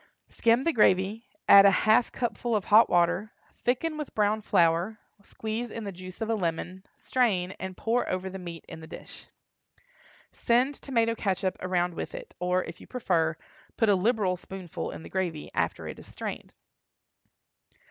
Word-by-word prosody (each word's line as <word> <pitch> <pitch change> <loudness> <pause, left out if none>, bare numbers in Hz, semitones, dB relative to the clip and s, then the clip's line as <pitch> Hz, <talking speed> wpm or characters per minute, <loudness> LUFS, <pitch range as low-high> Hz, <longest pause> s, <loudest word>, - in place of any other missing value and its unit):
Skim 235 +2 +2
the 335 - +1
gravy, 210 +1 +2 0.2
add 200 0 +10
a 200 - +8 0.2
half 220 +2 +4
cupful 240 -1 -2
of 205 - -1
hot 215 +2 +6
water, 175 +5 +2 0.3
thicken 305 +6 0
with 300 - -6
brown 210 +1 +2
flour, 170 +3 +2 0.2
squeeze 220 +3 -5
in 225 +1 -6
the 200 - -4
juice 185 +2 -11
of 225 - -2
a - - +3
lemon, 180 -1 -3
strain, 195 -8 +1
and 190 -1 -6
pour 235 +2 0
over 185 +1 -2
the 190 0 -6
meat 170 -2 -8
in 165 - -9
the 160 - -11
dish. - - -11 1.0
Send 250 +4 +2
tomato 230 -5 0
catsup 195 -3 -1
around 180 -1 0
with 170 - -5
it, - - -9
or 180 +1 +1
if 165 - -9
you - - -13
prefer, 165 -10 0 0.4
put 225 -3 +3
a 200 - +6
liberal 200 -1 +1
spoonful 185 -2 -6
in - - -8
the - - -10
gravy, 175 -5 -3
after - - -1
it - - -7
is - - -12
strained. - - -6
200 Hz, 170 wpm, -28 LUFS, 180-230 Hz, 1.0 s, add